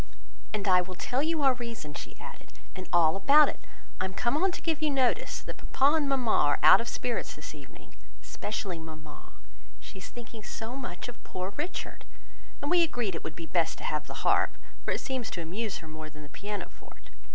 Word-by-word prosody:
"And 210 -1 -2
I 180 -1 +6
will 185 +1 -6
tell 250 +8 0
you 315 0 +1
our 265 -1 +6
reason," 235 -11 -6
she - - -8
added, - - -11 0.2
"and 185 -1 -7
all 165 -1 +5
about 285 +10 +7
it. - - -6 0.4
I 185 - +1
am 190 0 -5
come 235 +4 +1
on 370 +5 +3
to - - -6
give 320 -2 0
you 310 - +3
notice, 265 -3 +1
that - - -7 0.2
papa 285 +4 +5
and 290 -3 +1
mamma 255 -5 +2
are 145 -1 +4
out - - +9
of 235 - -5
spirits 240 0 -2
this - - -8
evening, - - -14 0.3
especially 195 -5 -4
mamma; 155 -2 -10 0.5
she 190 - -10
is 185 - -7
thinking 235 -2 -9
so 225 +3 -6
much 245 -10 -5
of 245 - -10
poor 185 +2 -4
Richard! 340 +5 -4 0.6
And 285 - -1
we 355 -1 +6
agreed 245 - +1
it 165 - -5
would 160 - -5
be 165 - -6
best 165 +1 +1
to - - -9
have 150 -1 -1
the - - -7
harp, - - +3 0.3
for - - -3
it - - 0
seems 260 -4 -2
to 170 - -4
amuse 200 +6 -3
her 160 - -10
more 155 0 -7
than 155 0 -12
the 145 - -11
piano 205 +4 -5
forte. - - -17
215 Hz, 220 wpm, -30 LUFS, 175-265 Hz, 0.6 s, out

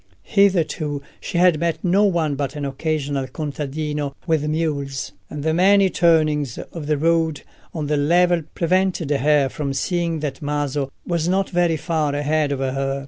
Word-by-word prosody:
Hitherto 160 -7 +1 0.2
she - - -4
had 175 -3 +4
met 170 -1 -1
no 190 +3 +3
one 170 -6 +1
but 140 0 -3
an 145 -1 -3
occasional 140 -1 -2
contadino 150 0 -4
with 160 -3 +1
mules, 145 - -2 0.2
and 150 -1 -6
the 160 0 +1
many 190 +2 +4
turnings 155 -6 +2
of 160 -4 -7
the 150 -1 +1
road 160 -1 +1 0.3
on 155 -3 -4
the 150 0 0
level 175 +4 +3
prevented 180 -2 +1
her 145 0 +3
from 140 0 -4
seeing 170 +2 -1
that 140 -3 -4
Maso 145 -2 -2
was 170 -2 -1
not 190 +1 0
very 175 -2 +2
far 155 -3 -1
ahead 145 0 0
of 140 - -1
her. 135 +1 -1
155 Hz, 160 wpm, -21 LUFS, 145-170 Hz, 0.3 s, had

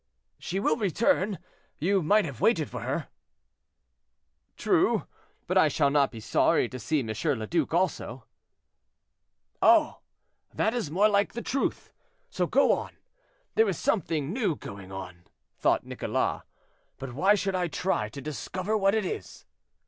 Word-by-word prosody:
"She 190 - -3
will 155 -6 +1
return, 210 - +1 0.4
you 190 +5 +1
might 205 +6 +3
have 135 -7 -7
waited 165 - +2
for - - -5
her." - - -3 1.5
"True; - - +2 0.4
but - - +2
I - - +5
shall 140 - +2
not 140 -2 +3
be 115 - -9
sorry - - +2
to 130 - -7
see 145 +6 0
M. 115 - -6 0.3
le 110 - -3
Duc 165 +2 0
also." 180 +3 -1 1.4
"Oh! - - +5 0.6
that 220 - +1
is 235 -11 -2
more 195 +7 +4
like 200 -1 +1
the 235 - -5
truth, 275 - -2 0.4
so - - 0
go - - +4
on. - - -2 0.6
There 225 -2 +3
is 180 - -2
something 160 -6 -1
new 215 - 0
going 100 -6 -10
on," 90 -2 -8 0.3
thought - - +2
Nicholas; - - -2 0.6
"but 135 -2 -7
why 190 +10 +4
should 195 -1 -1
I 180 -1 0
try 155 - -1
to 140 +6 -9
discover 185 +8 -3
what 195 0 +3
it 220 - 0
is?" 425 0 -6
175 Hz, 150 wpm, -27 LUFS, 140-205 Hz, 1.5 s, I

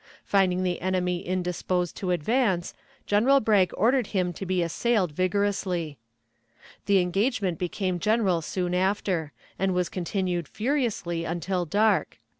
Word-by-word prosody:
Finding 185 -2 +2
the 180 -1 -1
enemy 180 -1 0
indisposed 180 0 -2
to 185 - -3
advance, 180 - +1 0.3
General 245 +7 +4
Bragg 210 -6 +3
ordered 240 +2 +2
him 180 -3 -1
to 190 +3 -6
be 185 -1 +1
assailed 190 +1 0
vigorously. 185 - -1 0.9
The 200 -1 +5
engagement 190 0 0
became 185 0 -2
general 205 -4 +2
soon 180 +2 -2
after, 185 -4 0 0.3
and 190 -1 +1
was 180 -1 0
continued 180 -2 -2
furiously 220 - -1
until 175 +2 -2
dark. 210 +6 +1
185 Hz, 125 wpm, -26 LUFS, 175-205 Hz, 0.9 s, The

